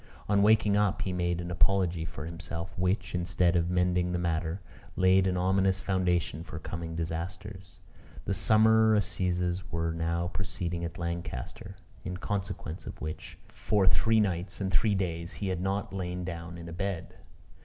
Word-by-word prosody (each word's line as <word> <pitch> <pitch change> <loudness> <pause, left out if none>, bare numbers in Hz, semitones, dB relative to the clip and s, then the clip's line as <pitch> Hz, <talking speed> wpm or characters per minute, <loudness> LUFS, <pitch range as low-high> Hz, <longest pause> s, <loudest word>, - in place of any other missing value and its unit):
On 100 -1 +3
waking 105 -1 +5
up, 105 -1 +2
he 95 - -2
made 85 -1 0
an 85 0 -4
apology 90 -2 +2
for 80 -2 -6
himself, 85 +1 -5
which, 90 0 0
instead 90 0 +2
of 85 0 +2
mending 90 0 +2
the - - +1
matter, 85 +1 -1 0.4
laid 95 +1 +4
an 90 -1 0
ominous 95 +1 +2
foundation 90 -5 0
for 85 - -8
coming 80 0 -5
disasters. 90 +3 -5 0.5
The 100 - 0
summer 110 +2 +5
assizes 90 -2 0
were 85 0 -1
now 85 +1 -1
proceeding 90 -2 -3
at 85 +1 -4
Lancaster: 85 +1 -5 0.3
in 90 0 -4
consequence 95 -3 -4
of - - -7
which, 75 0 -6
for 105 -3 0
three 110 +4 +4
nights 95 -2 -1
and 95 -2 -1
three 100 +2 +3
days, 85 -2 -2
he 100 - -3
had 90 -2 -1
not 95 +2 -1
lain 90 -1 -3
down 85 -1 -6
in 85 0 -8
a 85 - -7
bed. 95 -1 -4
90 Hz, 165 wpm, -29 LUFS, 85-95 Hz, 0.5 s, waking